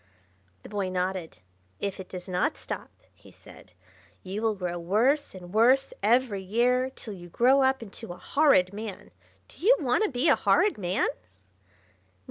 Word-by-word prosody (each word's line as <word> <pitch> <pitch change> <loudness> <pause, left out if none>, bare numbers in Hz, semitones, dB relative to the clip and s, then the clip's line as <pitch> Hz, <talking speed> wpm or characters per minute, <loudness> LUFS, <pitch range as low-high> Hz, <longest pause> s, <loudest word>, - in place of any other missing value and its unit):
The - - -11
boy 200 -2 -2
nodded. 185 - -3 0.4
"If 200 -1 -3
it 190 - -8
does 180 -1 -8
not 185 - 0
stop," - - -6 0.2
he - - -18
said, - - -17 0.5
"you 195 +3 -5
will 225 -1 +1
grow 175 -2 -4
worse 225 - +1
and 180 0 -11
worse 255 +5 +4
every 220 -1 +2
year, 245 +6 +1
till 230 -4 -9
you 175 -2 -11
grow 255 +9 +4
up 265 -2 +2
into 225 0 -9
a 175 - -8
Horrid 200 -9 +3
Man. 210 -2 -7 0.4
Do - - -16
you - - +6
want 270 - +1
to 425 - +1
be 255 +4 0
a - - +6
Horrid 415 - +2
Man?" 180 0 0
215 Hz, 165 wpm, -27 LUFS, 185-260 Hz, 0.5 s, you